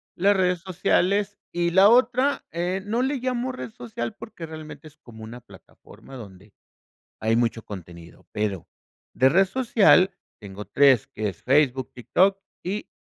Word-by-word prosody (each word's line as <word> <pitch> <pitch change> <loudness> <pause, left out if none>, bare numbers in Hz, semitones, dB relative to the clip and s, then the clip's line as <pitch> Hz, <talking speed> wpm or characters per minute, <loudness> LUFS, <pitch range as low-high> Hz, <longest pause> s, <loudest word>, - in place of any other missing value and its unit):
Las 200 +3 +3
redes 180 -2 +1
sociales 195 +3 0
y 170 0 -1
la 190 +3 +6
otra, 255 +4 +2
eh, 180 +3 -2
no 230 +4 -1
le 275 +1 -1
llamo 255 0 -2
red 125 - -8
social 120 0 -6
porque 175 -6 -9
realmente 155 0 -10
es 150 0 -18
como 110 -6 -14
una 120 +2 -10
plataforma 135 - -16
donde 100 -3 -13 0.7
hay 110 +1 +1
mucho 115 -1 0
contenido, 85 -4 -11
pero 105 -4 -3 0.5
de 130 +1 +4
red 190 +6 +4
social 200 -4 +3 0.3
tengo 100 0 -9
3 135 -6 +3
que 105 -1 -4
es 95 - -12
Facebook, 135 -1 +2
TikTok 190 +10 +1 0.2
y 200 +4 -4
160 Hz, 150 wpm, -24 LUFS, -, 0.7 s, la